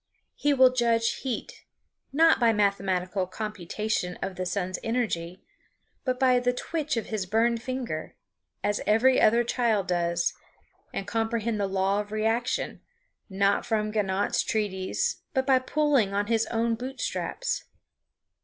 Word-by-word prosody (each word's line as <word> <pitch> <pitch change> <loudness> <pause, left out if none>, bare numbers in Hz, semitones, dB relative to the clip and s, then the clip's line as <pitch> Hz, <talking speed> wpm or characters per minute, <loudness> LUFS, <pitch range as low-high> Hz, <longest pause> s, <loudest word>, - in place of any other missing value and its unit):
He 290 - +1
will 260 -2 +6
judge 230 -2 +2
heat, 260 -3 -5 0.5
not 320 +3 +5
by 230 -2 +4
mathematical 195 -2 0
computation 210 -1 -3
of 195 -1 -4
the 185 0 -3
sun's 185 0 -2
energy, 200 -7 -2 0.6
but 255 -2 -1
by 255 -2 +4
the 245 0 +1
twitch 300 +1 -2
of 225 - -1
his 210 -4 -2
burned 230 +3 +2
finger, 245 -11 -4 0.5
as 205 0 0
every 245 +5 +4
other 235 +2 +5
child 230 -4 +1
does; 170 -1 0 0.6
and 195 - -4
comprehend 225 +1 -1
the 200 - +1
law 195 +1 +1
of 205 0 -5
reaction, 225 +3 -1 0.5
not 200 +1 +2
from 215 -3 -1
Ganot's 200 -2 +1
treatise, 195 -4 -1 0.2
but 265 0 +2
by 265 -1 +5
pulling 265 -7 +1
on 205 +1 +1
his 225 0 +1
own 230 0 0
boot 255 +3 -6
straps. - - -2
220 Hz, 140 wpm, -27 LUFS, 195-245 Hz, 0.6 s, will